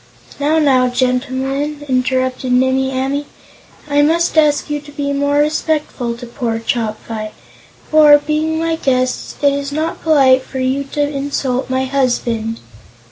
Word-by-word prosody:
"Now, 300 +3 +2
now, 265 -5 +3
gentlemen," 265 +4 -1
interrupted 255 0 0
Nimmie 260 +1 +2
Amee, 270 +2 -2 0.6
"I 290 0 +2
must 330 +4 +2
ask 300 -2 +3
you 295 -1 -3
to 290 0 -13
be 280 -1 -3
more 285 0 0
respectful 295 -5 -1
to 245 - -8
poor 235 -1 -3
Chopfyt. 220 -1 -3 0.6
For, 300 -1 +7
being 310 +2 -1
my 325 0 -1
guests, 255 -4 -1
it 285 -1 +4
is 280 0 -3
not 315 +3 -3
polite 270 -5 +4
for 265 - -9
you 260 +2 -1
to 295 - 0
insult 275 -3 -2
my 260 0 0
husband." 240 -4 -1
275 Hz, 140 wpm, -17 LUFS, 255-295 Hz, 0.6 s, For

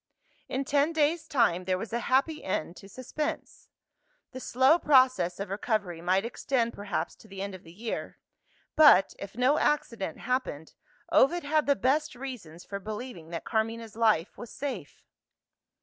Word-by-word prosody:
In 270 +1 -2
ten 290 +4 +2
days' 315 +1 +1
time, 185 -9 +2
there 185 0 +1
was 225 +4 -7
a 235 - +1
happy 275 +6 +1
end 175 -2 -2
to 195 - -13
suspense. 295 - -5 0.6
The 255 - -7
slow 260 +6 +3
process 255 - +3
of 200 -1 -5
recovery 200 -5 -2
might 185 +4 +1
extend 235 0 -1
perhaps 205 0 -3
to - - -17
the 195 -1 -10
end 200 0 -4
of 185 - -9
the 165 - -14
year. 220 +6 -5 0.6
But, 295 -10 +7
if 200 +3 -9
no 260 +5 +3
accident 230 - -1
happened, 250 - -3 0.4
Ovid 345 +6 +4
had 305 +1 +1
the 280 - +4
best 275 +3 +1
reasons 240 -11 -8
for 200 - -5
believing 210 -5 -7
that 170 -1 -6
Carmina's 225 -1 -2
life 215 -7 +1
was 240 - -8
safe. 240 - -6
230 Hz, 160 wpm, -28 LUFS, 195-270 Hz, 0.6 s, But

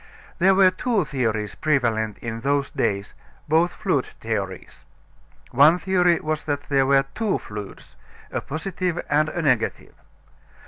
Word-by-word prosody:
There 190 +2 +5
were 190 -1 +6
two 210 -1 0
theories 110 -7 -2
prevalent 115 -8 0
in 115 -1 -4
those 140 +1 0
days 100 0 -2 0.3
both 165 +3 +2
fluid 165 -10 0
theories. 100 -5 -5 0.7
One 145 +7 +6
theory 180 -2 +2
was 155 0 -3
that 145 -1 -2
there 135 -2 +3
were 135 0 +4
two 220 -3 0
fluids, 105 -2 -9 0.4
a - - -2
positive 175 +2 -3
and 150 +1 +3
a 175 - -3
negative. 125 -6 0
145 Hz, 135 wpm, -23 LUFS, 115-175 Hz, 0.7 s, were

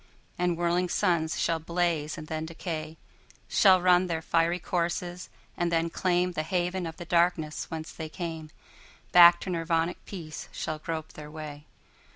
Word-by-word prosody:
And 180 -1 0
whirling 175 +1 +1
suns 165 -3 +1
shall 165 -1 +1
blaze 165 -2 -1
and 155 - -7
then 160 +1 -4
decay, 160 -1 -5 0.5
Shall 190 -2 +5
run 180 0 +4
their 165 -2 -2
fiery 165 +2 +2
courses 175 0 -2 0.3
and 175 -1 0
then 165 0 +1
claimThe 180 -2 +1
haven 180 +1 -1
of 160 - -8
the 175 - -7
darkness 170 -2 +1
whence 160 0 -5
they 160 -1 -7
came; 160 -2 -5 0.6
Back 175 -1 +9
to 185 - -4
Nirvanic 165 0 -1
peace 160 -6 -8
shall 155 0 -4
grope 160 0 -5
their 150 -1 -9
way. 150 -1 -8
170 Hz, 155 wpm, -28 LUFS, 160-175 Hz, 0.6 s, Back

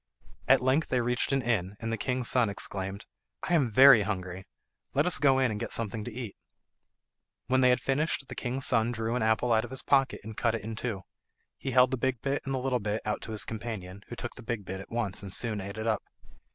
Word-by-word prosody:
At 130 -1 +5
length 135 +5 +2
they 125 - +1
reached 125 +2 +1
an 135 -1 +1
inn, 105 -4 -1
and 115 -1 -4
the - - +1
king's 125 +1 -2
son 125 -4 +3
exclaimed, 95 0 -4 0.4
"I - - -1
am 145 -8 +3
very 130 +1 +8
hungry; 95 -2 -4 0.5
let 145 - +3
us 180 - +3
go 135 -2 +4
in 130 -3 +2
and 105 - -4
get - - -4
something 110 -1 0
to 120 - -6
eat." 115 -3 -6 1.1
When 130 0 +2
they 125 - +5
had 125 0 +3
finished 135 +2 -1
the - - -7
king's 130 +2 -1
son 115 -1 +3
drew 115 0 -2
an 125 - -1
apple 110 +2 +2
out 110 0 +3
of 120 - -7
his 130 - -4
pocket 135 -1 +2
and 110 +1 -8
cut 115 0 +1
it 110 - -5
in 110 +1 -5
two; 110 -4 -4 0.5
he 135 - -5
held 125 0 +4
the 130 - 0
big 130 0 -1
bit 140 +1 -1
and 135 0 -2
the - - 0
little 130 -1 0
bit 105 +1 -3
out 105 - -2
to - - -7
his 105 -4 0
companion, 105 -4 -6
who 120 - -7
took 120 0 -5
the - - -10
big 115 -3 -4
bit 95 +1 -5
at - - -12
once 115 -5 -2
and 100 -2 -5
soon 105 0 -1
ate 100 +2 -7
it 110 - -4
up. 110 -2 +1
115 Hz, 245 wpm, -29 LUFS, 105-130 Hz, 1.1 s, very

